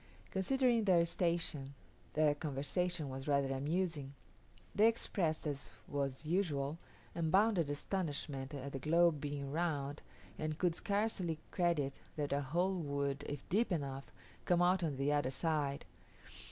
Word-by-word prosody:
Considering 240 +3 +2
their 175 -4 +5
station, 165 -6 -1 0.4
their 150 -1 +4
conversation 155 +3 -1
was 135 +1 -6
rather 140 -2 +2
amusing. 145 0 -1 0.6
They 215 +2 +6
expressed, 180 -9 0
as 145 -2 -3 0.2
was 140 0 -2
usual, 155 -4 0 0.3
unbounded 175 0 +3
astonishment 145 -4 -2
at 140 0 -5
the 135 - -4
globe 165 +1 +3
being 145 -2 -3
round, 145 -3 -1 0.4
and 155 -1 -2
could 175 -1 +2
scarcely 200 -4 0
credit 170 -7 +1 0.2
that 145 -2 -1
a 140 - +1
hole 175 +7 0
would, 140 -1 -1
if 145 -2 -6
deep 210 +4 +2
enough, 140 -5 -3 0.3
come 175 0 +4
out 180 +1 +4
on 155 -5 -1
the 140 +2 +2
other 145 -3 +2
side. 145 -1 -1
155 Hz, 135 wpm, -36 LUFS, 140-175 Hz, 0.6 s, They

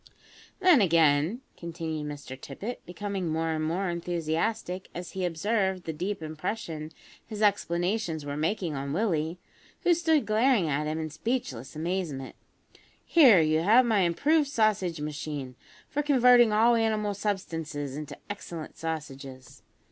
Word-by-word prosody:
"Then, 360 - +6
again," 165 - +3
continued 160 -3 -5
Mr 145 -3 -7
Tippet, 170 - -7
becoming 195 0 -4
more 160 +1 0
and 155 -1 -1
more 175 +5 -1
enthusiastic 175 +3 -2
as 175 0 -6
he 190 -1 -2
observed 190 +2 0
the 160 - -4
deep 185 +3 -3
impression 155 -1 -5 0.3
his 215 -1 -5
explanations 175 -4 0
were 145 0 -4
making 165 +2 -1
on 140 0 -4
Willie, 165 -4 0 0.4
who 355 -1 +4
stood 320 -3 +2
glaring 220 -3 +3
at 150 +1 -1
him 155 +1 -2
in 155 -1 -4
speechless 150 - -3
amazement, 160 -5 -3 0.7
"here 255 - +7
you 155 0 +2
have 220 +9 +5
my 220 -3 +2
improved 285 - +2
sausage 210 - +1
machine 150 -3 -5 0.3
for 295 - -1
converting 250 -5 +5
all 225 +3 +5
animal 215 -2 +1
substances 165 -9 -3
into 150 -1 -7
excellent 170 -6 -7
sausages. 140 -5 -6
175 Hz, 135 wpm, -28 LUFS, 155-215 Hz, 0.7 s, here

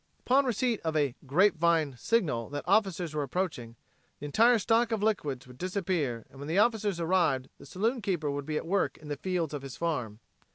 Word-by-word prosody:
Upon 270 +2 +3
receipt 240 -1 0
of 160 -1 -3
a 145 -4 +1
"grapevine" 165 -3 +3
signal 145 - 0
that 145 0 -4
officers 185 -5 +1
were 150 - -1
approaching, 140 -6 -3 0.4
the - - -7
entire 230 +11 +4
stock 230 +2 +2
of 220 -2 -1
liquids 145 - -1
would 125 0 -15
disappear 180 - -2
and 135 - -14
when 140 - -7
the 165 +4 -1
officers 210 -4 +2
arrived 165 -7 +1
the - - -12
saloonkeeper 195 - -1
would 140 0 -4
be 155 -1 -1
at - - -4
work 195 +3 0
in 150 - -12
the 145 - -2
fields 175 -2 -2
of 145 - -4
his 135 -2 -8
farm. 125 -11 -2
170 Hz, 195 wpm, -29 LUFS, 145-200 Hz, 0.4 s, entire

